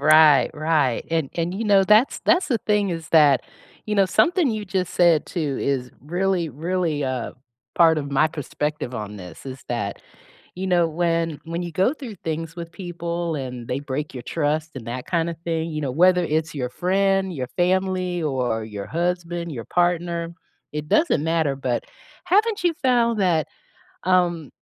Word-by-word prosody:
Right, 155 -2 +6
right. 150 -5 +1
And 160 -4 0
and 175 +2 -1
you 220 - -3
know, 200 -2 +5
that's 215 +6 +4
the 325 -9 +3
thing 210 -2 +2
is 165 -2 -4
that 145 -5 +5 0.4
you 210 - -1
know, 195 -2 +4
something 345 - +3
you 215 -2 -3
just 185 -2 -2
said 170 -3 +4
too 150 -6 -2
is 130 -3 -1
really, 175 +3 0
really 160 +1 -1
a 130 -2 -3 0.4
part 165 -2 +5
of 140 -1 -5
my 145 +3 +4
perspective 150 -3 -4
on 105 -1 -5
this 90 +5 -11
is 130 0 -7
that, 105 -5 -3 0.6
you 190 +1 -3
know, 175 -2 +3
when 165 -1 0
when 170 +2 -4
you 175 - -5
go 190 - +2
through 240 -9 -8
things 165 +1 -4
with 170 0 -7
people 170 -2 -4
and 125 -3 -6
they 125 - -1
break 145 +1 -4
your 125 - -6
trust 155 0 -1
and 125 -4 -8
that 125 +1 -5
kinda 170 -1 0
thing, 165 -1 -1
you 155 -1 -3
know, 135 -3 -2
whether 180 +3 +4
it's 155 0 -1
your 125 -2 -2
friend, 195 +2 +1
your 130 -5 -4
family, 185 -1 +1
or 125 -6 -1
your 105 -2 -7
husband, 175 0 -2
your 115 -4 -6
partner, 170 -1 0 0.4
it 150 0 -5
doesn't 310 - +3
matter, 160 -3 +1
but 130 -3 -2 0.4
haven't 410 +3 +2
you 345 -2 +3
found 235 -4 +3
that, 165 -5 +2 0.6
um, 175 -4 +2
165 Hz, 175 wpm, -23 LUFS, 145-185 Hz, 0.6 s, Right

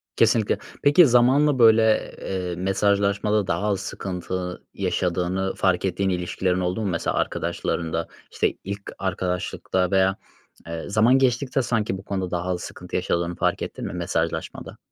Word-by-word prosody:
Kesinlikle. 110 -3 +3 0.3
Peki 145 +3 +7
zamanla, 130 +3 +4
böyle, 110 -1 +5
eee, 90 -2 -3
mesajlaşmada 100 +2 +1
daha 85 +5 0
az 100 -2 0
sıkıntı 90 -1 -5
yaşadığını 90 +2 -1
fark 95 0 +1
ettiğin 95 +1 0
ilişkilerin 90 0 -1
oldu 90 +4 -1
mu 105 - -1
mesela 85 -3 -1
arkadaşlarında? 85 -1 -2 0.2
İşte, - - 0
ilk 100 +1 -5 0.2
arkadaşlıkta 90 0 -2
veya, 95 0 +3 0.5
eee, 85 -1 -5
zaman 110 +5 +4
geçtikçe 130 +1 +1
sanki 110 -5 -1
bu 95 - -11
konuda 95 -3 -3
daha 90 -1 -1
az 90 -1 -1
sıkıntı - - -8
yaşadığını 85 0 -1
fark - - 0
ettin - - -5
mi - - -5
mesajlaşmada? - - -3
95 Hz, 140 wpm, -24 LUFS, 90-110 Hz, 0.5 s, Peki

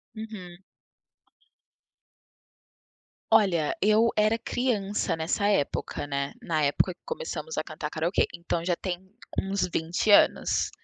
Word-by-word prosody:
Uhum. 195 -5 -9 2.7
Olha, 185 -9 +3
eu 215 +3 +4
era 215 +2 +3
criança 215 -7 -1
nessa 165 +6 0
época, 170 -7 0
né, 140 -1 -3
na 165 -9 -1
época 145 +6 +2
que - - -44
começamos 480 0 -5
a - - 0
cantar - - -6
karaokê, 165 +4 +1
então 170 0 -3
já 175 0 +1
tem 180 0 -4 0.4
uns 195 -1 0
vinte 170 +6 0
anos. 205 - +4
195 Hz, 115 wpm, -27 LUFS, 170-215 Hz, 2.7 s, eu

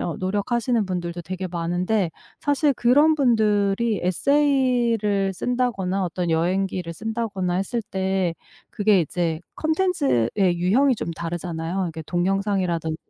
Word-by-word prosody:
어 170 - -2
노력하시는 210 +4 0
분들도 175 -2 -4
되게 185 +2 -5
많은데 175 +3 -1 0.3
사실 290 0 +2
그런 290 +7 +4
분들이 215 -4 +2
에세이를 235 - +2
쓴다거나 195 -4 -1
어떤 175 -1 -2
여행기를 180 +1 0
쓴다거나 210 -3 -3
했을 195 +6 -1
때 190 -2 0 0.4
그게 205 -2 +3
이제 165 0 -1 0.2
컨텐츠의 315 - +1 0.3
유형이 245 +10 +3
좀 210 - -4
다르잖아요. 170 0 -4
그러니까 165 -4 -3
동영상이라든지 180 -3 0
195 Hz, 320 characters per minute, -23 LUFS, 175-235 Hz, 0.4 s, 그런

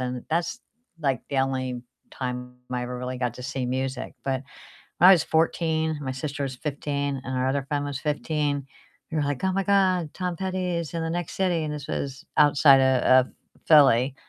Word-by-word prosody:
and 125 -1 -4
that's, 170 +9 -1 0.4
like, 135 -5 0
the 140 - -2
only 130 -2 -1 0.3
time 125 -1 -5 0.2
I 125 0 -1
ever 125 0 -5
really 125 0 -4
got 125 -2 -1
to 125 - -9
see 135 -1 -3
music. 130 +1 -3
But 135 -1 -1 0.6
when 180 - +8
I - - +10
was 170 - +4
14, 160 -1 +1
my 130 -2 -3
sister 140 +1 -4
was 130 - -4
15, 140 -1 -3
and 130 0 -3
our 130 +1 +1
other 140 +1 -1
friend 145 -1 -1
was 145 -2 -4
15, 150 -1 -1 0.5
we 160 - -3
were 150 - +1
like, 145 +1 -2
"Oh 190 - +2
my 195 +1 0
god, 185 -5 +2
Tom 180 -2 -3
Petty 185 -1 -2
is 170 -1 -4
in 165 - -2
the 165 - -2
next 175 0 -3
city." 180 -4 +1
And 150 - -3
this 145 -2 -7
was 135 -2 -4
outside 145 -2 +6
o 130 -1 +4 0.2
of 130 - -2 0.4
Philly, 135 -4 +6
140 Hz, 200 wpm, -25 LUFS, 130-160 Hz, 0.6 s, I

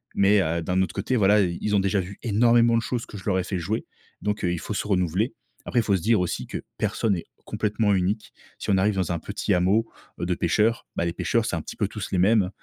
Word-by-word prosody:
Mais, 100 0 +4
heu, 85 0 0
d'un 90 +3 +1
autre 95 - -1
côté 110 +6 -1
voilà, 105 +1 +5
ils 85 -2 -1
ils 105 -1 0
ont - - +4
déjà 95 +1 +1
vu 95 +2 -6
énormément 115 +1 +4
de 115 - +2
choses 120 0 -3
que - - -12
je 95 - -10
leur 95 -3 +1
ai 90 - 0
fait 95 -1 -3
jouer. 100 +7 -2 0.4
Donc, 105 0 -1
heu, 90 - +1
il 85 - -2
faut 105 - -5
se 105 - -2
renouveler. 95 +4 +1 0.3
Après, 120 - +1
il - - -4
faut 100 - +2
se 90 - -2
dire 110 +1 +3
aussi 90 - -2
que - - -5 0.2
personne 110 -3 +1
n'est 85 - -3 0.2
complètement 105 -1 0
unique. 95 +4 -1 0.2
Si - - -2
on 95 - +4
arrive 100 +2 +2
dans 90 -2 -1
un 85 - -1
petit - - -2
hameau 100 +6 +2 0.3
heu, 85 - -2
de 90 - 0
pêcheurs, 110 +7 +1
bah 85 - 0
les 85 - -1
pêcheurs, - - 0
c'est - - -1
un - - -2
petit - - -8
peu - - 0
tous - - -6
les 95 - +1
mêmes. 100 0 +4
100 Hz, 270 wpm, -25 LUFS, 90-110 Hz, 0.4 s, voilà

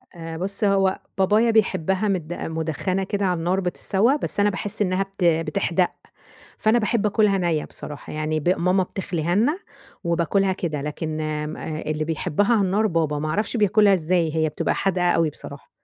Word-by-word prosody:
آآ 165 -1 -7
بُص، 195 +5 -4
هو 195 -2 +2 0.2
بابايا 210 +5 +3
بيحبها 190 -2 +1
مد 175 -4 -1
مدخّنة 160 +4 -2
كده 200 +1 -1
على 180 -2 +1
النار 180 +3 0
بتتسوّى. 195 +7 +1
بس 285 - -4
أنا 205 0 +4
باحس 205 +2 -4
إنّها 185 0 +1
بت 195 -1 -7
بتحْدَق، 170 +2 +1 0.7
فأنا 220 +2 +3
باحب 215 0 0
آكلْها 210 -1 +3
نَيّة 170 -4 0
بصراحة. 150 -1 -9
يعني 155 0 -1
ب 155 - 0
ماما 180 +2 +2
بتخلِيها 175 -2 -2
لنا 280 - +2 0.4
وباكلها 170 +3 +1
كده. 155 -6 -3
لكن 155 +1 -4
آمم 150 0 -3
آآ 155 0 -5
اللي 155 0 -2
بيحبها 165 +6 0
على 215 - +3
النار 200 +3 +2
بابا، 160 -5 0
ما 155 +1 -2
أعرفش 210 +7 -1
بياكلها 210 -1 +4
إزاي! 165 -2 +1
هي 160 -1 +2
بتبقى 150 - -1
حادْقة 180 -2 +1
أوي 165 -2 +2
بصراحة. - - -10
185 Hz, 175 wpm, -23 LUFS, 160-200 Hz, 0.7 s, أنا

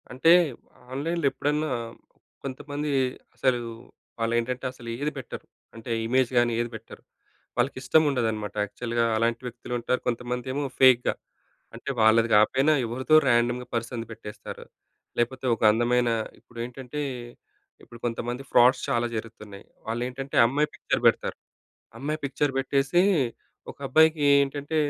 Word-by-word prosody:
అంటే 130 +6 +4 0.6
ఆన్‌లైన్‌లో 165 +4 -2
ఎప్పుడన్నా 150 +1 -1 0.7
కొంతమంది 145 +2 -4 0.4
అసలు 130 -2 +1 0.6
వాళ్ళేంటంటే 120 +2 -1
అసలు 120 -2 -13
ఏది 145 +3 -2
పెట్టరు. 130 -3 -7 0.3
అంటే 115 +1 -7 0.2
ఇమేజ్ 130 +1 +2
గాని 120 -1 +3
ఏది 120 0 -1
పెట్టరు. 110 0 -11 0.5
వాళ్ళకి 125 +3 0
ఇష్టం 135 +4 +4
ఉండదనమాట 110 -6 -2
యాక్చువల్‌గా 115 +3 -2
అలాంటి 115 +1 0
వ్యక్తులు 125 0 -7
ఉంటారు. 125 +2 -1
కొంతమందేమో 125 +3 -2 0.2
ఫేక్‌గా. 130 -2 +6 0.6
అంటే - - -7
వాళ్ళది 110 +1 +5
కాపోయినా 130 +8 +4
ఎవరితో 130 +6 +1
ర్యాండమ్‌గా 120 0 +2
పర్సన్‌ది 115 0 -3
పెట్టేస్తారు. 105 -1 -9 0.5
లేపోతే 130 +2 -1
ఒక - - -19
అందమైన 120 +2 +2 0.3
ఇప్పుడేంటంటే 125 +4 -7 0.8
ఇప్పుడు 120 - -13
కొంతమంది 120 +2 -3
ఫ్రాడ్స్ 125 +2 +5
చాలా 120 0 +1
జరుగుతున్నాయి. 105 -3 -8 0.2
వాళ్ళ 115 +1 -2
ఏంటంటే 135 +2 -6
అమ్మాయి 145 +5 +1
పిక్చర్ - - -1
పెడతారు. - - +1 0.6
అమ్మాయి 150 +4 -2
పిక్చర్ 140 +1 0
పెట్టేసి 135 +5 +2 0.7
ఒక - - -14
అబ్బాయికి 160 +3 +4 0.2
ఏంటంటే 145 +2 -3
125 Hz, 120 wpm, -26 LUFS, 115-135 Hz, 0.8 s, ఫేక్‌గా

